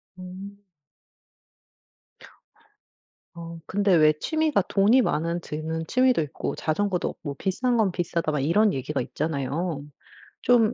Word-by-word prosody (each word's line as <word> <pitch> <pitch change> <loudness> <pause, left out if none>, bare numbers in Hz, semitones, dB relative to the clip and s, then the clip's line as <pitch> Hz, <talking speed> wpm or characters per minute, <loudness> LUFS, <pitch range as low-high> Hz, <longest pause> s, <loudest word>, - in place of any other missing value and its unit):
어. 185 +2 -9 2.8
어 165 0 -8
근데 200 -1 +2
왜 155 -2 +6
취미가 310 - +1
돈이 215 +6 +4
많은 170 -2 0
드는 160 +1 -4
취미도 255 -6 +3
있고 145 - -4
자전거도 180 +3 -1
없고 145 -3 -7
비싼 240 - 0
건 205 -4 +2
비싸다 170 -2 -1
막 150 - -1
이런 195 +9 +3
얘기가 135 +2 -3
있잖아요. 150 +3 -3 0.6
좀 240 -2 +4
175 Hz, 235 characters per minute, -25 LUFS, 155-205 Hz, 2.8 s, 왜